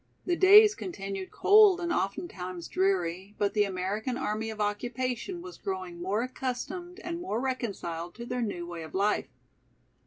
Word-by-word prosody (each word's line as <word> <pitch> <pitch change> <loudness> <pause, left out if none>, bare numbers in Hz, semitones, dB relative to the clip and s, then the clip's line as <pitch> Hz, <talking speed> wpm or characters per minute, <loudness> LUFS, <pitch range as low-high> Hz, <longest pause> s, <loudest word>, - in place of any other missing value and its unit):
The 355 - +1
days 415 +4 +8
continued 195 - -5
cold 410 -3 +6
and 345 -1 -1
oftentimes 185 - -3
dreary, 190 +1 0
but 205 -1 +1
the 210 -1 +3
American 200 +6 -2
Army 225 -4 -2
of 220 -1 -7
Occupation 245 - -2
was 365 -1 -10
growing 185 -3 -5
more 200 +6 0
accustomed 265 +9 -5
and 340 0 -4
more 350 -11 -2
reconciled 195 -10 -3
to 235 - -7
their 250 +1 -2
new 200 -6 -3
way 170 -1 -7
of 160 - -9
life. 205 +2 +1
215 Hz, 155 wpm, -29 LUFS, -, -, days